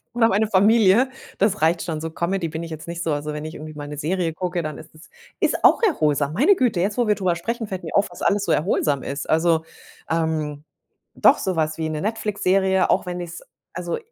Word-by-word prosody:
oder 230 -1 +4
meine 210 +3 +2
Familie. 215 +4 +4 0.3
Das 205 -2 +1
reicht 165 +2 +2
schon. 155 -2 -4
So 160 - -3
Comedy 170 +2 -2
bin 160 +1 -5
ich 165 - -8
jetzt 155 0 -8
nicht 170 0 -4
so. 160 - 0
Also, 150 +1 -3
wenn 150 0 -5
ich 155 - -6
irgendwie 155 -1 -9
mal 145 -1 -7
'ne 150 0 -7
Serie 165 +2 -1
gucke, 175 0 -3
dann 155 -1 -5
ist - - -14
es 155 - -16 0.3
ist - - 0
auch - - +5
erholsam. 150 - +1
Meine 300 - +4
Güte, 245 - +1
jetzt 200 +4 -1
wo 240 - +2
wir 210 - +4
drüber 185 -4 0
sprechen, 225 +6 -3
fällt 190 -2 -5
mir - - -6
auf, 200 0 +3
was 175 - -10
alles 200 0 +2
so - - 0
erholsam 150 -4 +1
ist. 140 +1 -5
Also, 160 0 +3 0.5
ähm, 155 -3 -1 0.5
doch, - - +5
so 185 - -2
was 155 -1 -1
wie 160 -1 -2
'ne 155 -1 -3
Netflix-Serie, 195 -3 +1
auch 190 - +2
wenn 180 0 -4
ich's 175 -1 -7 0.3
also, 175 -2 -3
170 Hz, 230 wpm, -22 LUFS, 155-195 Hz, 0.5 s, auch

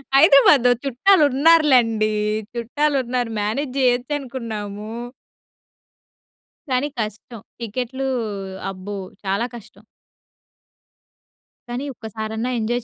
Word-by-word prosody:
హైదరాబాద్‌లో 275 -3 +7
చుట్టాలున్నారు 300 +2 +4
లెండి, 225 -3 +3 0.4
చుట్టాలున్నారు 245 -1 -1
మ్యానేజ్ 250 +6 -2
జేయొచ్చనుకున్నాము. 245 -5 -2 1.8
కానీ 255 +2 +1
కష్టం. 215 +1 -5 0.2
టికెట్లు 250 +4 -3 0.6
అబ్బో! 195 +2 -7 0.3
చాలా 195 +5 0
కష్టం. 215 -3 -14 1.9
కానీ 245 +4 -4
ఒక్కసారన్నా 220 +1 -4
ఎంజాయ్ 240 +2 -1
245 Hz, 70 wpm, -21 LUFS, 220-270 Hz, 1.9 s, హైదరాబాద్‌లో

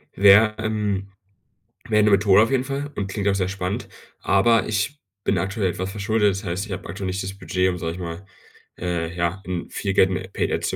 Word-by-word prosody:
Wär, 100 +2 +6
ähm 105 -3 -2 0.8
wär 105 -1 +3
'ne 105 - +4
Methode 100 0 +5
auf 115 - 0
jeden 130 -1 +2
Fall 140 +2 -4
und 100 - -2
klingt 100 +1 -3
auch 100 - +3
sehr 95 -2 0
spannend, 100 +3 -3 0.3
aber 115 +3 +3
ich 110 +7 -1 0.2
bin - - +1
aktuell 95 0 -1
etwas 95 +2 -4
verschuldet. 105 0 +1
Das 95 +3 -5
heißt, 90 +2 -3
ich 110 - -10
habe 90 - -5
aktuell 95 +2 -5
nicht 95 +1 -2
das 95 +1 -6
Budget, 95 -1 0
um, 90 - -2
sage 80 -2 -3
ich 90 - -9
mal, 85 +2 -6 0.5
äh, 85 -1 -3
ja, 85 +2 -1
in 90 -2 -4
viel 100 -1 -2
Geld 95 - +5
in 95 +1 -4
Paid - - -1
Ads - - -1
zu - - -2
100 Hz, 225 wpm, -23 LUFS, 95-105 Hz, 0.8 s, Wär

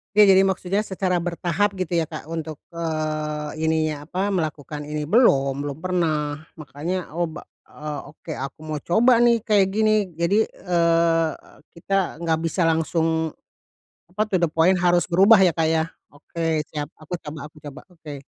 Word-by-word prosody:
Ya, 210 -2 +7
jadi 190 0 +6
maksudnya 195 +2 -1
secara 185 -1 -1
bertahap 175 +3 -1
gitu 180 -2 -2
ya, 165 - +1
Kak, 155 -1 -9
untuk 160 -2 -5
eee, 155 -2 -3
ininya 155 -2 0
apa, 190 +4 -2
melakukan 150 -5 -3
ini 150 0 -4
belum, 140 - +3
belum 145 0 -4
pernah. 155 -5 -1 0.2
Makannya, 160 +4 -5
oh 175 - +2
ba 160 - -8 0.2
eee, 150 -1 -7
oke, 160 - -16
aku 135 +2 -6
mau 155 -1 -4
coba 230 - +3
nih 235 -1 +4
kayak 210 -4 +3
gini. 215 -4 +2
Jadi, 180 +7 +2
eee, 165 -2 +1 0.4
kita 180 -1 -2
enggak 165 -1 +1
bisa 165 +3 -1
langsung 160 -1 +1 0.8
apa, 200 +4 -1
to 185 -4 0
the 170 - +2
point 165 +4 +3
harus 175 0 +3
berubah, 195 +5 +6
ya, 185 -3 +4
Kak, 160 -1 +1
ya. 160 0 +1 0.2
Oke, 160 +1 -3
siap. 150 0 -5
Aku 155 +3 -7
coba 150 -1 -7
aku 150 - -18
coba, 145 -1 -9
oke. 160 -6 -10
165 Hz, 165 wpm, -23 LUFS, 155-185 Hz, 0.8 s, Ya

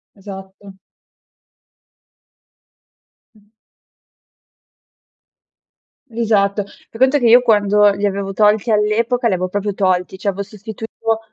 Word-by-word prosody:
Esatto. 195 0 -12 2.6
Mh. 210 -1 -26 2.6
Esatto. 215 -4 0
Fai 225 +3 -17
conto 265 +2 +4
che 245 - -1
io 240 +2 +7
quando 210 -3 +3
li 200 +1 -3
avevo 195 0 -3
tolti 210 +2 +2
all'epoca, 230 +4 +1
li 200 - +1
avevo 185 0 -2
proprio 205 +1 -3
tolti, 185 -1 -1
cioè, 200 - -2
avevo 200 0 -4
sostituito 220 +2 -5
205 Hz, 100 wpm, -17 LUFS, 195-225 Hz, 2.6 s, io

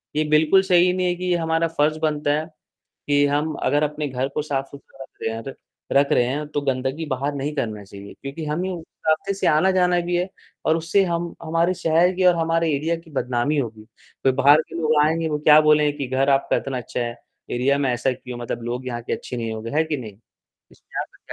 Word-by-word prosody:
ये 155 - +2
बिल्कुल 155 +5 +5
सही 180 -1 +4
नहीं 185 -1 0
है 175 - 0
कि 180 0 -1
हमारा 165 0 +1
फर्ज 155 -1 +1
बनता 150 -1 +1
है, 155 - -4 0.6
कि 145 0 +4
हम 150 +2 0
अगर 145 +1 +2
अपने 150 0 -2
घर 130 +1 -2
को 150 - 0
साफ 135 -2 -2
सुथरा 135 -1 -12
रख - - -18
रहे 110 - -1
हैं 115 - -6
तो 135 - -5 0.4
रख 140 +1 +4
रहे 120 - +4
हैं 145 +4 -2
तो 145 -1 -2
गंदगी 135 +3 -2
बाहर 140 +2 -2
नहीं 145 +2 -3
करनी 110 -7 -3
चाहिए। 100 +1 -11
क्योंकि 140 +4 -6
हमें 170 +5 -2
उस 170 -3 -6 0.2
रास्ते 160 +5 +1
से 195 - -2
आना-जाना 180 +2 +3
भी 175 - 0
है 180 +2 0 0.4
और 160 - +4
उससे 170 +4 +2
हम 170 -1 -2
हमारे 165 +3 +1
शहर 170 +2 +3
की 185 0 0
और 180 -1 +6
हमारे 165 0 +1
एरिया 160 +4 0
की 165 -1 -15
बदनामी 130 +3 0
होगी, 110 -5 -3 0.4
फिर 135 - +4
बाहर 145 +4 +5
के - - -11
लोग 155 0 +3
आएँगे 160 +1 +1
वो 150 -1 -1
क्या 150 +1 +7
बोलेंगे 150 -1 +4
कि 140 - -2
घर 135 +2 +1
आपका 135 0 +2
इतना 135 -2 -3
अच्छा 125 - -5
है, 120 -1 -2 0.4
एरिया 135 +3 +1
में 135 -3 +1
ऐसा 125 +2 0
क्यों? 125 -1 -8
मतलब 120 0 -5
लोग 125 +2 -4
यहाँ 120 -2 -4
के - - -5
अच्छे 125 - -4
नहीं 115 -2 -3
होंगे, 110 +1 -6
है 160 - +3
कि 155 -2 -2
नहीं? 110 -6 -8 0.6
इसपे - - -7
आपका - - -8
150 Hz, 230 wpm, -22 LUFS, 130-165 Hz, 0.6 s, क्या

